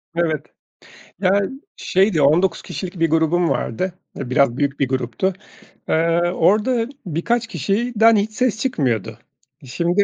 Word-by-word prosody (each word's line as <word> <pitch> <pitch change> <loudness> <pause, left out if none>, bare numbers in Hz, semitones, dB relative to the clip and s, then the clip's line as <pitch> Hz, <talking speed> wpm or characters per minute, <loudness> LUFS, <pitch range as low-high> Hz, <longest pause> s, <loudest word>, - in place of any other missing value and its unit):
Evet, 160 -3 0 0.8
yani 195 +1 +2 0.3
şeydi, 190 -4 +2
19 165 +5 +3
kişilik 180 -2 -7
bir 165 -1 +2
grubum 165 +2 +2
vardı. 180 +10 -2 0.3
E, 135 -3 -5
biraz 130 -2 +3
büyük 140 -1 -1
bir 140 - +2
gruptu. 130 - -1 0.6
Eee, 165 +1 +2 0.2
orada 225 +4 +2 0.2
birkaç 220 +8 -1
kişiden 220 - +2
hiç 210 +1 0
ses 225 -1 0
çıkmıyordu. 120 - -1 0.5
E, - - -12
şimdi 170 +7 -2
170 Hz, 130 wpm, -20 LUFS, 145-205 Hz, 0.8 s, 19